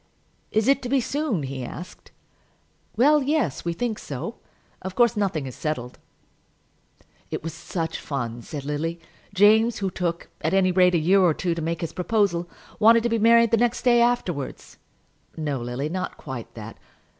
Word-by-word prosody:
"Is 220 +2 +1
it 275 0 +4
to 245 - -5
be 275 +1 +3
soon?" 260 - -1
he 135 -1 -5
asked. 175 +8 -9 0.9
"Well, 295 +4 +5
yes; 270 - 0
we 170 - -1
think 225 +4 -2
so. 150 - -6 0.4
Of 185 0 -6
course 240 -2 +4
nothing 190 -9 -1
is 130 - -7
settled." 125 -5 -4 1.3
"It - - -4
was 165 - -5
such 165 -1 -4
fun," 120 -5 -4
said 140 +3 -7
Lily. 160 +4 -2 0.3
"James, 215 +4 +4
who 195 -2 -2
took, 170 -2 -3
at - - 0
any 185 -1 +4
rate, 180 0 +4
a - - +5
year 185 +5 +4
or 170 -4 +4
two 175 -2 -1
to 165 - -4
make 165 +1 -2
his 165 - -4
proposal, 180 -3 0 0.3
wanted 230 +1 +6
to 240 - +1
be 230 0 +1
married 230 +1 +5
the 230 - +4
next 240 0 +1
day 240 -2 +5
afterwards." 185 - -1 0.6
"No, 145 -4 -2
Lily; 120 +4 -3
not 185 +4 -4
quite 130 -5 -7
that." 110 0 -9
180 Hz, 175 wpm, -24 LUFS, 155-230 Hz, 1.3 s, wanted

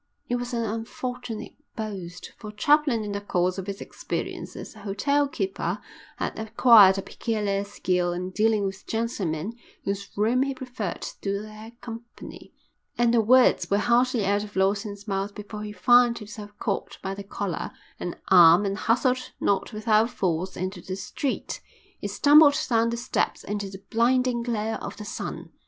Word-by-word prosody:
It 245 - 0
was 245 0 -4
an 230 - 0
unfortunate 225 +1 -5 0.2
boast, 190 -6 -6
for 210 - -7
Chaplin 280 +1 +3
in 205 - -4
the 200 0 -3
course 185 -1 0
of 190 - -6
his 200 +1 -5
experience - - -5
as - - -8
a - - -13
hotel 275 +9 +1
keeper 380 +7 -2 0.4
had - - -3
acquired 220 -3 +7
a 195 - -3
peculiar 205 -4 -2
skill 180 -3 -1
in 180 +1 -4
dealing 215 0 +2
with 190 0 -6
gentlemen 210 -5 -2 0.3
whose 200 0 -3
room 230 +5 +2
he 275 0 0
preferred 245 -8 -5
to 200 0 -3
their 215 +2 -11
company, 235 0 -10 0.5
and 240 -1 +3
the 235 - +5
words 255 +4 +4
were 200 - +3
hardly 240 0 +2
out 205 +1 +1
of 210 -1 -10
Lawson's 200 +2 0
mouth 195 0 -2
before 210 0 -7
he 210 0 -5
found 240 +4 +5
himself 210 -1 -8
caught 200 -2 -3
by 190 - -2
the 200 +1 -7
collar 200 -2 -4 0.3
and 175 - -4
arm 175 +1 +8
and 195 0 -1
hustled 255 +2 +1
not 200 +2 0
without 215 +1 +2
force 185 -5 -2
into 185 0 -4
the 185 - -5
street. 260 +7 -3 0.4
He - - -3
stumbled 290 0 +6
down 230 -2 +2
the 235 - -2
steps 235 - -1
into 205 -1 -3
the 190 0 -11
blinding 245 +1 +2
glare 225 -2 -2
of - - -6
the 210 - -7
sun. - - -6
210 Hz, 170 wpm, -26 LUFS, 195-235 Hz, 0.5 s, arm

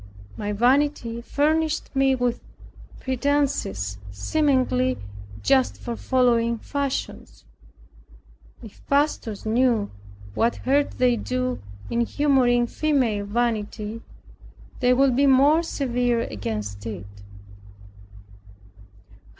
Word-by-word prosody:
My 210 0 -3
vanity 245 +1 +1
furnished 310 +5 0
me 270 0 +3
with 245 -1 -1 0.6
pretences 260 - -1
seemingly 130 - +1 0.5
just 265 -2 +2
for 240 -2 -5
following 235 -2 +2
fashions. 275 - -4 1.2
If 215 - -13
pastors 280 -8 0
knew 230 -2 +1 0.4
what 230 - +1
hurt 280 +2 0
they 250 -1 +3
do 255 +2 -2 0.3
in 235 - +1
humoring 245 -2 +2
female 240 -8 0
vanity, 220 -1 -2 0.8
they 250 -1 +3
would 260 0 +3
be 280 +2 +4
more 280 +4 +5
severe 245 -6 0
against 105 - -5
it! 100 -4 -6
245 Hz, 90 wpm, -24 LUFS, 220-275 Hz, 1.2 s, more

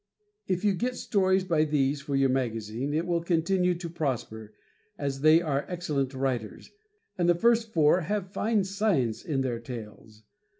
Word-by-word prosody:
If 185 +2 -1
you 205 - +4
get 245 +7 -2
stories 190 -5 +1
by 165 -4 +2
these 145 -2 0
for 140 0 -3
your 135 -1 +3
magazine 120 0 -2
it 160 +3 0
will 170 -1 0
continue 180 +2 +1
to 170 0 -6
prosper, 120 -9 -4 0.4
as 140 -1 -3
they 155 +3 +6
are 145 -3 0
excellent 145 -7 -2
writers, 130 -5 -3 0.5
and 175 0 +3
the 175 - +5
first 230 +3 +2
four 160 +1 +4
have 195 +2 -3
fine 215 -2 +1
science 190 - 0
in 140 -4 -1
their 125 -3 -2
tales. 110 -2 -10
155 Hz, 165 wpm, -27 LUFS, 130-185 Hz, 0.5 s, they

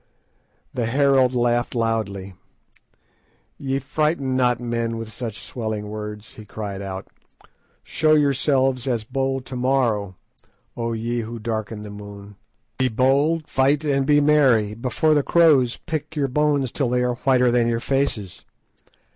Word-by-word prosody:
The 120 -3 -1
herald 135 0 +3
laughed 120 0 +1
loudly. 105 -5 -2 1.3
"Ye 135 0 -1
frighten 140 0 -1
not 125 -2 +2
men 115 -1 -2
with 115 -1 -6
such 115 -2 -5
swelling 110 -3 -4
words," 105 0 -7
he 110 - -11
cried 100 -1 -6
out. 95 -1 -6 0.8
"Show 155 0 +2
yourselves 135 -3 +2
as 120 -4 0
bold 135 +2 -2
to 130 - -7
morrow, 120 -7 0 0.6
O 115 -1 -2
ye 115 +2 -2
who 115 +1 -5
darken 110 -1 -4
the 105 - -8
moon. 100 0 -10 0.4
Be 130 - +3
bold, 140 +7 +2
fight, 140 +3 +2
and 140 -2 +1
be 145 -1 +5
merry, 135 -8 +3
before 125 +7 +1
the 145 - +3
crows 140 -7 +4
pick 155 -2 -5
your 145 -2 0
bones 145 -1 +1
till 135 -4 -1
they 125 0 +1
are 125 0 +1
whiter 125 0 +2
than 120 -1 +2
your 115 -1 0
faces. 120 -8 -2
125 Hz, 145 wpm, -22 LUFS, 110-135 Hz, 1.3 s, be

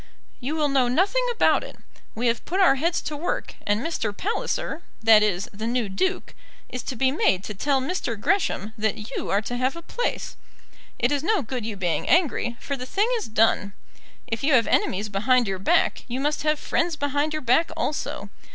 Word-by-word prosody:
"You 275 +4 -3
will 305 -2 +2
know 270 -3 +2
nothing 385 - +2
about 470 - +3
it. - - -9 0.4
We 235 - -2
have 230 0 +1
put 370 +4 -2
our 365 -8 +6
heads 330 +6 0
to 300 - -4
work, 320 +5 -3
and 205 +2 +2
Mr. 225 -10 -2
Palliser, 380 -4 -2 0.2
that 220 -1 +7
is, 200 -2 +1
the 215 +3 -4
new 235 -3 0
Duke, 375 - -1 0.4
is 250 - -4
to 260 - -4
be 260 +2 +2
made 195 - +2
to 210 - -5
tell 275 +7 +1
Mr. 260 - -3
Gresham 220 - 0
that 215 0 -2
you - - -3
are 200 +2 +1
to 245 +3 -4
have 255 +3 0
a 335 - -9
place. 485 - -3 0.6
It 245 +3 +1
is 285 -1 +1
no 380 +1 +1
good 240 -1 -4
you 220 - -4
being 180 -4 -1
angry, 285 -8 +2
for 280 - -3
the 255 -1 -7
thing 415 - +1
is 440 - -4
done. 215 -2 +2 0.5
If 225 +3 -4
you 290 +1 +3
have 235 -3 +5
enemies 200 +3 +1
behind 230 +4 +2
your 190 -1 -2
back, 330 - +2
you 250 +1 -3
must 295 +2 0
have 305 0 +1
friends 330 +2 0
behind 285 +1 0
your 310 -1 -3
back 255 +7 +3
also. 300 - -3
260 Hz, 205 wpm, -24 LUFS, 220-310 Hz, 0.6 s, that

